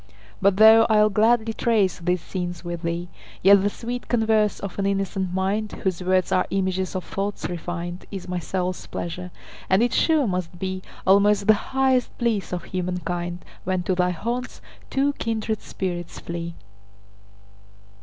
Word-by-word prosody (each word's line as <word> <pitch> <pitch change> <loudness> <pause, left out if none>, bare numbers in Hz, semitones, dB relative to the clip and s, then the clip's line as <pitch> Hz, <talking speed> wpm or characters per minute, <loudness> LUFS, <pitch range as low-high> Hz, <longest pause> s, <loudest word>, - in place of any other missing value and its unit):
But 195 0 +4
though 220 +1 +8
I'll 215 -1 +5
gladly 225 +2 +3
trace 215 -7 +1
these 180 0 0
scenes 175 -2 -4
with 175 -1 -4
thee, 170 +1 -2 0.4
Yet 200 +1 +7
the 200 - +2
sweet 245 +4 -6
converse 220 -3 +2
of 200 0 -6
an 195 - +1
innocent 195 -2 -1
mind, 195 +3 -1
Whose 185 -2 -1
words 185 0 +1
are 185 -1 +2
images 190 -1 -1
of 185 - -2
thoughts 200 +1 -3
refin'd, 175 0 -5
Is 195 -3 -7
my 180 0 -2
soul's 180 +2 -3
pleasure; 180 +1 -5 0.4
and 190 +4 +4
it 240 - +1
sure 315 -4 +3
must 180 -4 -3
beAlmost 195 +2 +1
the 215 - +7
highest 260 +3 0
bliss 230 -5 0
of 180 -1 -3
human 180 -1 -3
kind, 175 -1 -4 0.2
When 185 0 -1
to 185 - 0
thy 180 0 +2
haunts 235 +9 -3 0.3
two 275 +1 +1
kindred 220 -1 -2
spirits 175 -2 -4
flee. 170 0 -5
190 Hz, 155 wpm, -24 LUFS, 180-215 Hz, 0.4 s, though